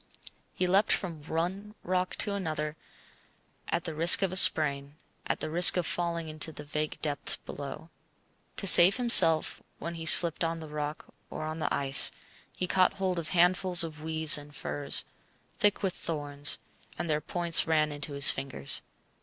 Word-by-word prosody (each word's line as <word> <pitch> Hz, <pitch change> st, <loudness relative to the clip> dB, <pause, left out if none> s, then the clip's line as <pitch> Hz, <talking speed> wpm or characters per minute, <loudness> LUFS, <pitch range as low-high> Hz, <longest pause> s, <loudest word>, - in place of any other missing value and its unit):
He 185 Hz, -, -3 dB
leapt 195 Hz, +4 st, 0 dB
from 170 Hz, -5 st, -4 dB
one 180 Hz, +7 st, -6 dB
rock 185 Hz, 0 st, -4 dB
to 205 Hz, -, -3 dB
another 155 Hz, -5 st, -6 dB, 0.9 s
at -, -, -4 dB
the 165 Hz, -, -7 dB
risk 165 Hz, +5 st, +5 dB
of 190 Hz, -, -2 dB
a -, -, -7 dB
sprain, 145 Hz, -5 st, +2 dB, 0.3 s
at -, -, -4 dB
the -, -, -6 dB
risk 175 Hz, +2 st, +5 dB
of 175 Hz, -, -3 dB
falling 170 Hz, -2 st, -5 dB
into 155 Hz, +1 st, -1 dB
the 150 Hz, -, -12 dB
vague 150 Hz, +1 st, -6 dB
depths 145 Hz, -3 st, -3 dB
below. 145 Hz, +3 st, -11 dB, 0.7 s
To -, -, -6 dB
save 180 Hz, +2 st, +9 dB
himself 185 Hz, -10 st, +4 dB, 0.2 s
when 170 Hz, +3 st, -8 dB
he 165 Hz, -1 st, -9 dB
slipped 170 Hz, 0 st, +6 dB
on 165 Hz, 0 st, -4 dB
the 160 Hz, -1 st, -12 dB
rock 150 Hz, 0 st, -8 dB, 0.2 s
or -, -, -9 dB
on 155 Hz, +1 st, -8 dB
the -, -, -5 dB
ice, 135 Hz, -1 st, +2 dB, 0.5 s
he 185 Hz, -, -4 dB
caught 185 Hz, +1 st, 0 dB
hold 185 Hz, -2 st, -4 dB
of 165 Hz, -, -9 dB
handfuls 180 Hz, 0 st, 0 dB
of 155 Hz, -2 st, -10 dB
weeds 160 Hz, -1 st, 0 dB
and 145 Hz, 0 st, -16 dB
furze, 145 Hz, -1 st, -3 dB, 0.5 s
thick 205 Hz, 0 st, -1 dB
with 190 Hz, -2 st, -2 dB
thorns, 145 Hz, -3 st, -2 dB, 0.4 s
and -, -, -6 dB
their 150 Hz, -1 st, -3 dB
points 170 Hz, +2 st, +3 dB
ran 155 Hz, -1 st, -1 dB
into 145 Hz, 0 st, -4 dB
his 140 Hz, -1 st, +7 dB
fingers. 130 Hz, -, -3 dB
160 Hz, 170 wpm, -26 LUFS, 150-180 Hz, 0.9 s, save